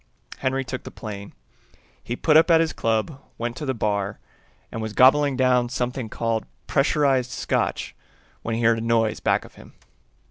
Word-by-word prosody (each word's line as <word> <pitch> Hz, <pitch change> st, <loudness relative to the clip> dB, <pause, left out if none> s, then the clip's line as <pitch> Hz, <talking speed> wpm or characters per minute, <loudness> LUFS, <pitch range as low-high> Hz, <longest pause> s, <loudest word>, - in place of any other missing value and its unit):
Henry 135 Hz, 0 st, -1 dB
took 130 Hz, 0 st, -5 dB
the -, -, -9 dB
plane. 100 Hz, -2 st, -8 dB, 0.7 s
He 120 Hz, -, -4 dB
put 150 Hz, +4 st, +2 dB
up 160 Hz, +2 st, +6 dB
at 165 Hz, -1 st, +6 dB
his 165 Hz, -1 st, +1 dB
club, 115 Hz, +6 st, -1 dB, 0.2 s
went 120 Hz, 0 st, -3 dB
to 150 Hz, -, -5 dB
the 130 Hz, -, 0 dB
bar, 100 Hz, -3 st, -1 dB, 0.5 s
and 115 Hz, -, -5 dB
was 110 Hz, -1 st, -4 dB
gobbling 135 Hz, +2 st, +5 dB
down 125 Hz, -2 st, +3 dB
something 125 Hz, -1 st, -3 dB
called 115 Hz, 0 st, -2 dB, 0.2 s
pressurized 135 Hz, -3 st, +2 dB
scotch, -, -, -2 dB, 0.5 s
when 115 Hz, -, -3 dB
he 115 Hz, -, -2 dB
heard 115 Hz, 0 st, +4 dB
a -, -, -5 dB
noise 115 Hz, -1 st, +1 dB
back -, -, +1 dB
of -, -, -15 dB
him. -, -, -16 dB
125 Hz, 175 wpm, -24 LUFS, 115-135 Hz, 0.7 s, up